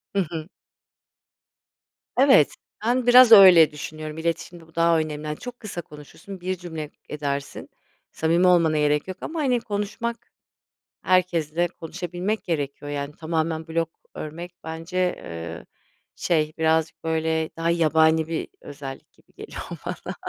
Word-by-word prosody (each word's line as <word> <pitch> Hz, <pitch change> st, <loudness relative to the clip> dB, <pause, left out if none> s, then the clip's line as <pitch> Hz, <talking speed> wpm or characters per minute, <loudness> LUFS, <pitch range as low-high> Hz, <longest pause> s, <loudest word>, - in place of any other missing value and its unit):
Hı -, -, +3 dB
hı. 160 Hz, -1 st, -5 dB, 1.7 s
Evet. 260 Hz, -, +5 dB, 0.3 s
Ben, 245 Hz, +1 st, +1 dB
biraz 245 Hz, -1 st, +8 dB
öyle 185 Hz, -7 st, +9 dB
düşünüyorum, 155 Hz, +1 st, -7 dB
iletişimde 165 Hz, 0 st, -4 dB
bu 165 Hz, -, -23 dB
daha 165 Hz, 0 st, +4 dB
önemli, 155 Hz, -1 st, -4 dB
hani, 150 Hz, -, -3 dB
çok 245 Hz, 0 st, -9 dB
kısa 195 Hz, -6 st, -6 dB
konuşursun, 155 Hz, +6 st, -12 dB
bir 185 Hz, +1 st, -2 dB
cümle 160 Hz, -4 st, -6 dB, 0.2 s
edersin, 140 Hz, -2 st, -4 dB, 0.4 s
samimi 170 Hz, +3 st, +2 dB
olmana 165 Hz, -3 st, +4 dB
gerek 150 Hz, +2 st, +1 dB
yok 185 Hz, 0 st, -6 dB
ama 325 Hz, 0 st, -4 dB
hani 255 Hz, -4 st, +2 dB
konuşmak, 225 Hz, +2 st, -4 dB, 0.7 s
herkesle 175 Hz, -2 st, +1 dB
konuşabilmek 180 Hz, +5 st, -4 dB
gerekiyor, 145 Hz, -3 st, -3 dB
yani 140 Hz, 0 st, -4 dB
tamamen 160 Hz, 0 st, -2 dB
blog 165 Hz, 0 st, 0 dB, 0.3 s
örmek 170 Hz, +3 st, -7 dB
bence, 165 Hz, +2 st, -6 dB
eee, 85 Hz, -, -3 dB, 0.5 s
şey, 155 Hz, -3 st, 0 dB
birazcık 160 Hz, 0 st, +1 dB
böyle, 160 Hz, 0 st, 0 dB
daha 165 Hz, +1 st, 0 dB
yabani 160 Hz, -1 st, +3 dB
bir 165 Hz, -, -3 dB
özellik 140 Hz, -2 st, -9 dB
gibi -, -, -29 dB
geliyor -, -, -8 dB, 0.2 s
bana. -, -, -5 dB
165 Hz, 130 wpm, -24 LUFS, 155-180 Hz, 1.7 s, öyle